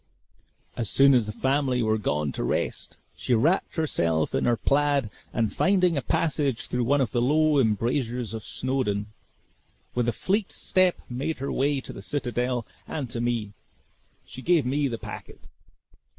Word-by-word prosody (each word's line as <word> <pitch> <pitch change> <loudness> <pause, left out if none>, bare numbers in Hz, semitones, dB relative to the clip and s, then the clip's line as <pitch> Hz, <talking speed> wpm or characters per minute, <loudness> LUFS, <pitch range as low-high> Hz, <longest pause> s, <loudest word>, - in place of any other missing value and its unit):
As 115 -4 -2
soon 140 0 +6
as 120 -4 +3
the - - -3
family 130 +1 +1
were 110 0 +1
gone 75 -7 -1
to - - -4
rest, - - -2 0.2
she 125 - 0
wrapped 160 - +1
herself 85 - 0
in - - +1
her 120 -1 +3
plaid 140 -5 +1 0.2
and 115 -2 0
finding 185 -3 +3
a 140 - 0
passage 140 -2 0
through 125 -1 -1
one 140 +3 +3
of 120 -5 0
the 120 - +1
low 150 +3 +3
embrasures 120 +1 0
of 110 -2 -5
Snawdoun, 110 -6 -2 0.8
with 120 -1 +1
a - - +2
fleet 195 - -1
step 185 -1 +2
made 135 +6 -3
her 135 +1 -3
way 140 +1 +1
to - - -8
the - - -8
citadel 125 -1 -2 0.2
and 135 -6 -4
to 115 - -3
me. 115 -4 -1 0.7
She 130 - -10
gave 165 -2 +3
me 140 +3 +1
the 120 -3 -3
packet. - - -9
125 Hz, 165 wpm, -26 LUFS, 115-145 Hz, 0.8 s, soon